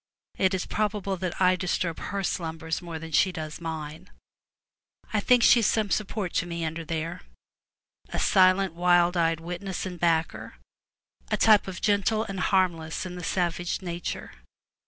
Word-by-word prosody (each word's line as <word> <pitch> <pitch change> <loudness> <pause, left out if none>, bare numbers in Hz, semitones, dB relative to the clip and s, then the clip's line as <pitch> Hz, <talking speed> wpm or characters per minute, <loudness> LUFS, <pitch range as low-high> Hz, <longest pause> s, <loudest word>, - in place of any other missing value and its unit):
It 190 0 +3
is 185 - -2
probable 205 -2 -1
that 180 -1 -4
I 185 -1 +4
disturb 175 -2 -2
her 200 0 -3
slumbers 160 -2 -3
more 170 -2 -6
than 160 0 -8
she 185 +5 +3
does 155 -2 -6
mine. 160 +2 -6 1.0
I 215 - +3
think 245 +3 +4
she 240 - +7
is 225 - +2
some 215 -3 0
support 205 -3 -2
to 170 - 0
me 170 -1 -3
under 165 +1 -4
there 165 +1 -4 0.4
— - - -67
a - - -4
silent 185 0 +4
wild 175 0 +3
eyed 165 -1 +1
witness 180 +3 -5
and 180 -2 -6
backer; 165 -1 0 0.7
a - - +1
type 215 -3 +5
of 190 - -5
the - - -9
gentle 215 +1 +2
and 195 -4 -6
harmless 175 -5 0
in 180 -1 -6
savage 175 +1 -1
nature. 175 -1 -5
180 Hz, 165 wpm, -26 LUFS, 165-195 Hz, 1.0 s, she